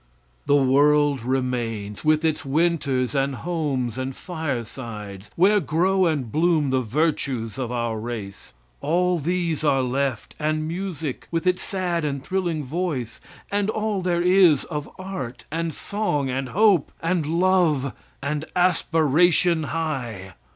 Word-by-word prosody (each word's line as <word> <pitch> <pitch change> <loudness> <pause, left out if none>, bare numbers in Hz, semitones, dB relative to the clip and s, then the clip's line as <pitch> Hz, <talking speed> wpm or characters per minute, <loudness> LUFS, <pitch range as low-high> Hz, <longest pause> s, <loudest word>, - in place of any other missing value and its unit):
The 145 - +5
world 145 0 +4
remains, 120 -5 -2
with 155 +1 +3
its 160 -1 0
Winters 140 -4 +1
and 135 -1 0
homes 135 -7 -2
and 130 0 -3
firesides, 115 - -5
where 200 +4 +5
grow 180 +4 +2
and 140 -8 -1
bloom 155 -3 +2
the 130 -1 +2
virtues 130 -3 -1
of 125 -2 -3
our 120 -2 -2
race. 110 - -7 0.2
All 180 +3 +1
these 170 0 -1
are 135 -3 +3
left; 130 -1 -2
and 155 0 0
music, 165 -5 -4
with 165 +1 -2
its 180 0 +2
sad 180 -4 -2
and 140 -2 -2
thrilling 175 -5 -1
voice, 140 -5 -3 0.3
and 205 0 +1
all 215 -2 -1
there 175 -1 +1
is 180 -6 +5
of 150 -3 -5
art 185 -10 -6
and 165 +1 -1
song 150 -8 -2
and 130 0 -2
hope, 195 - +3
and 165 -2 0
love 170 - +2 0.3
and 150 +2 -2
aspiration 170 -1 +3
high. 125 - -4
150 Hz, 135 wpm, -24 LUFS, 130-175 Hz, 0.3 s, The